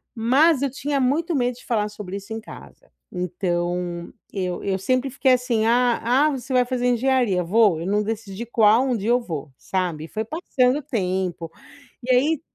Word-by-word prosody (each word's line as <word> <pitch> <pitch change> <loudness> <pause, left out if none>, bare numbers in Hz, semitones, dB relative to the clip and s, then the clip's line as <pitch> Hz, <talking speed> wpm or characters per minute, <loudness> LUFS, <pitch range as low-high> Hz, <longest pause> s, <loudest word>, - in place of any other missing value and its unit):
mas 270 +6 +3
eu 280 - +1
tinha 280 +1 -2
muito 310 +6 +1
medo 245 -2 0
de 250 - -16
falar 210 -3 0
sobre 200 -2 -7
isso 200 +3 -8
em 225 - -4
casa. - - -14 0.2
Então, 175 -1 -3 0.2
eu 185 -3 -3
eu 195 -1 0
sempre 255 +7 0
fiquei 260 0 +2
assim: 240 -3 +1
"Ah 240 0 +3
ah, 265 +6 +3
você 265 0 -5
vai 250 0 +5
fazer 250 -1 -2
engenharia. 245 -6 +2
Vou. 195 -2 +3
Eu 175 - -4
não 210 +1 +1
decidi 215 0 -5
qual, 225 +1 +4
um 250 - +1
dia 210 +3 -3
eu 245 +1 +4
vou", 155 - -6
sabe? 180 -5 -2
E - - -11
foi 220 +5 -3
passando 265 -3 +1
o - - -10
tempo, 185 - -2 0.5
e 255 - 0
aí 295 +4 +2
230 Hz, 190 wpm, -23 LUFS, 190-255 Hz, 0.5 s, vai